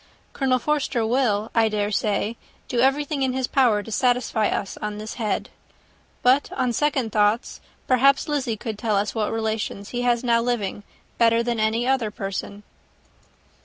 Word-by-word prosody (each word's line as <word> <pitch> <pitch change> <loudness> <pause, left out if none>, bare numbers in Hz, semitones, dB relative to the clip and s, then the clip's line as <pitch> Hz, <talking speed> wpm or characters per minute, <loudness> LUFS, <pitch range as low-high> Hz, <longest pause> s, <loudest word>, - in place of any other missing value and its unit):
Colonel 260 -2 +1
Forster 260 -4 0
will, 220 -3 +1
I 225 -1 +3
dare 210 -1 -1
say, 210 +2 0 0.3
do 245 - -1
everything 275 +3 +1
in 260 -1 +1
his 260 0 0
power 240 -6 +2
to 225 - -10
satisfy 245 -2 +1
us 195 - -3
on 210 0 -4
this 215 +1 -6
head. 210 -3 -2 0.7
But, 260 +3 +3
on 250 -2 0
second 265 -3 0
thoughts, 210 +2 +1 0.2
perhaps 270 +2 +3
Lizzy 270 -7 -1
could 215 0 -5
tell 215 -2 0
us 200 +1 0
what 215 -2 -1
relations 220 -2 -3
he 245 - -3
has 240 -1 +1
now 235 -1 +3
living 230 -5 -2 0.4
better 230 0 +4
than 235 -1 -1
any 220 +2 +1
other 260 -5 +1
person." 200 0 -5
230 Hz, 165 wpm, -23 LUFS, 215-255 Hz, 0.7 s, better